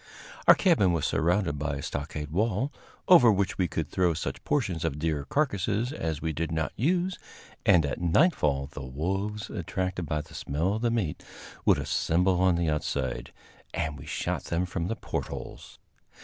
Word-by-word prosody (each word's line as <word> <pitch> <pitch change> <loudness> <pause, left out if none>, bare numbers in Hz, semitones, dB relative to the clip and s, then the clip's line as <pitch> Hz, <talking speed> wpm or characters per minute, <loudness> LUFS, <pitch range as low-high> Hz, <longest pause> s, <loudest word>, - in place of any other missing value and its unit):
Our - - +10
cabin 150 - +3
was 80 -4 0
surrounded 85 -3 +1
by 75 -1 -2
a 70 - -5
stockade 75 0 -4
wall, 110 - 0 0.3
over 145 -11 +8
which 100 -1 0
we 90 - +3
could - - -3
throw 90 -3 +1
such 80 - -4
portions 95 - 0
of 80 -4 -1
deer 75 -2 -1
carcasses 115 - 0
as 80 - -3
we 80 -1 -1
did 80 +1 -2
not 80 -1 -1
use, 180 +7 0 0.5
and 85 -5 +6
at 70 - -3
nightfall 80 - +2
the 75 - -7
wolves, 95 +11 -3
attracted 90 -2 -3
by 75 0 -1
the - - -15
smell 80 +8 -1
of 110 - -3
the 120 - +2
meat, 110 -10 -1 0.4
would - - +5
assemble 90 +2 +1
on 95 -2 +4
the 85 -1 0
outside, 70 -4 -2 0.4
and 75 -2 -2
we 70 - -11
shot - - -2
them 85 +2 0
from 85 -1 -3
the 115 - -2
portholes. - - -6
85 Hz, 175 wpm, -28 LUFS, 75-105 Hz, 0.5 s, Our